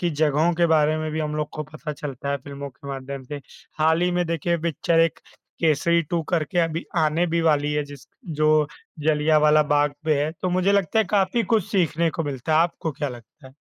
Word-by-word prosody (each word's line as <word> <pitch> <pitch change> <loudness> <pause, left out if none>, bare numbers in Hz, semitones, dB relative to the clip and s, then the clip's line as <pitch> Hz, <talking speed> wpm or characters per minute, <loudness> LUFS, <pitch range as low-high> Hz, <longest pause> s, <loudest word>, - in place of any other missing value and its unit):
की 175 -1 0
जगहों 155 +2 +2
के 170 0 +3
बारे 155 -1 +3
में 155 0 -3
भी 160 - -2
हम 150 0 -2
लोग 150 -1 -2
को 155 - -3
पता 155 -1 -6
चलता 140 -1 -5
है 140 - +1
फ़िल्मों 140 0 -7
के 130 +4 -13
माध्यम 135 0 -6
से। 145 +2 -7 0.4
हाल 160 +2 +3
ही 180 - +2
में 175 0 +1
देखिए 170 +1 0
पिक्चर 165 0 +1
एक 165 -1 +2 0.4
केसरी 170 +2 +3
2 165 - +1
करके 170 0 0
अभी 165 0 0
आने 160 +3 +2
भी 170 0 0
वाली 150 -2 +2
है 150 -1 0
जिस 145 -2 -12 0.2
जो 155 -1 +2 0.3
जलियांवाला 150 0 +4
बाग 145 0 +1
पे 150 -2 +2
है, 155 - -2
तो 185 - 0
मुझे 185 +2 +2
लगता 200 +1 +1
है 220 - +4
काफ़ी 205 +3 +2
कुछ 210 -5 +1
सीखने 170 -3 +1
को 165 - -3
मिलता 140 +2 -3
है, - - +5
आपको 165 -2 -3
क्या 145 +1 -3
लगता 125 +4 -13
है? 130 - -16
155 Hz, 220 wpm, -23 LUFS, 145-170 Hz, 0.4 s, है